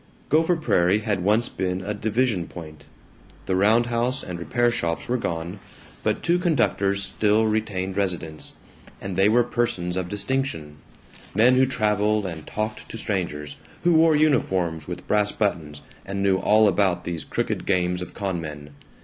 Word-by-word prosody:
Gopher 160 +4 +3
Prairie 100 - +2
had 100 -5 -1
once 105 +5 +2
been 95 0 -3
a 105 +2 -3
"division 105 -3 0
point." 80 -3 -10 0.6
The 95 - 0
roundhouse 120 +5 +2
and 90 -2 -6
repair 120 +7 +1
shops 85 -8 -2
were 125 - 0
gone, 85 0 -4 0.4
but - - -1
two 175 +1 +2
conductors 100 - +1
still 105 +2 +2
retained 105 -4 -1
residence, 90 -6 -3 0.4
and 95 -1 -5
they 95 +3 +4
were 120 +2 +4
persons 120 -8 -1
of 90 -1 -3
distinction, 100 - -3 0.6
men 120 +5 +5
who 130 +1 +4
traveled 105 -3 +1
and 80 -4 -6
talked 110 0 -4
to - - -7
strangers, 85 -9 -3 0.3
who 175 - +4
wore 160 -1 +5
uniforms 90 - +1
with - - -7
brass 105 0 +1
buttons, 80 -8 -2 0.2
and 100 0 -3
knew 95 -1 +3
all 110 +2 +4
about 95 -2 +1
these 85 -3 -4
crooked - - -3
games 90 -1 +1
of 90 - -8
con 95 -4 -2
men. 75 -2 -8
100 Hz, 160 wpm, -24 LUFS, 90-115 Hz, 0.6 s, men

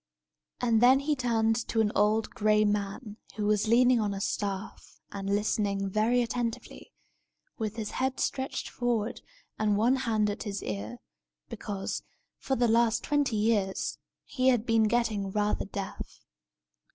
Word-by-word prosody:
And 230 -2 +2
then 260 +3 +6
he 295 +1 0
turned 225 -3 +1
to 225 - -1
an 215 -2 +2
old, 215 +1 +2
gray 215 0 +2
man, 205 +2 -2 0.2
who 210 - -2
was 210 +1 +2
leaning 245 +2 +5
on 205 -2 -1
a - - -4
staff, 200 0 -4
and 195 0 -5
listening 200 -1 0
very 230 +4 +2
attentively, 235 0 -4 0.7
with 215 -1 -3
his 220 -2 -4
head 260 0 -1
stretched 265 0 -2
forward 240 -2 -2 0.4
and 210 -2 +2
one 240 +5 +3
hand 220 -5 +1
at 205 - -6
his 205 -2 -4
ear, 105 +2 -5 0.5
because, 195 -2 -4 0.4
for 270 - -1
the 240 -1 +2
last 230 0 +2
twenty 285 -5 +1
years, 210 -3 0 0.3
he 255 -2 -1
had 245 -4 +3
been 225 -2 +3
getting 215 -3 0
rather 210 +1 0
deaf. 195 0 -7
220 Hz, 150 wpm, -29 LUFS, 205-240 Hz, 0.7 s, then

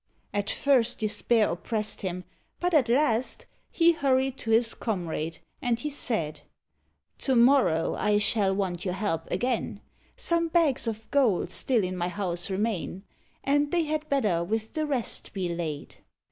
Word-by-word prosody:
At 205 0 -1
first 260 -5 +2
despair 215 +1 +1
oppressed 210 +4 -2
him; 180 -1 -3 0.4
but 355 0 0
at 270 -7 +4
last 250 -2 +1 0.2
He 340 0 +4
hurried 270 -4 +1
to 225 - -6
his 230 +1 +3
comrade, 165 -6 -3 0.2
and 235 -1 0
he 300 +4 -3
said 170 - -2 0.8
"To 265 - +1
morrow 235 - +4
I 210 -1 +1
shall 205 -1 +3
want 185 -3 -2
your 180 -2 -2
help 190 -5 -2
again; 245 +7 -1 0.4
Some 335 -1 +1
bags 315 -7 +2
of 220 0 -4
gold 250 -10 +2
still 240 -6 +1
in 185 0 -2
my 175 -1 -1
house 180 -1 -3
remain, 195 -2 -2 0.4
And 290 +1 +2
they 345 +1 +1
had 310 0 -3
better 210 -12 +1
with 220 +4 -3
the 310 -1 -1
rest 265 -6 -1
be 185 -3 -2
laid." 155 -4 -5
225 Hz, 155 wpm, -27 LUFS, 185-270 Hz, 0.8 s, at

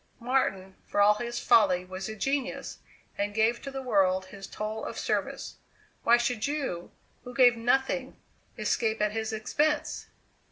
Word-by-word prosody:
Martin, 230 -7 0
for - - -1
all 205 +1 +7
his 240 +2 -4
folly 195 -6 +4
was 185 +2 -6
a 220 - -5
genius, 270 +4 -2 0.4
and 205 0 -1
gave 225 +2 +2
to 275 - -6
the 270 -1 -6
world 190 -5 +2
his 195 0 -10
toll 215 +1 -5
of - - -5
service. - - -2 0.4
Why 235 +1 +5
should 240 -1 -1
you, 275 - -3 0.3
who 250 -1 -9
gave 245 -1 +6
nothing, 260 +3 0 0.4
escape 220 -2 0
at 210 0 +1
his 220 0 -3
expense?" 295 +8 -1
225 Hz, 155 wpm, -28 LUFS, 205-255 Hz, 0.4 s, all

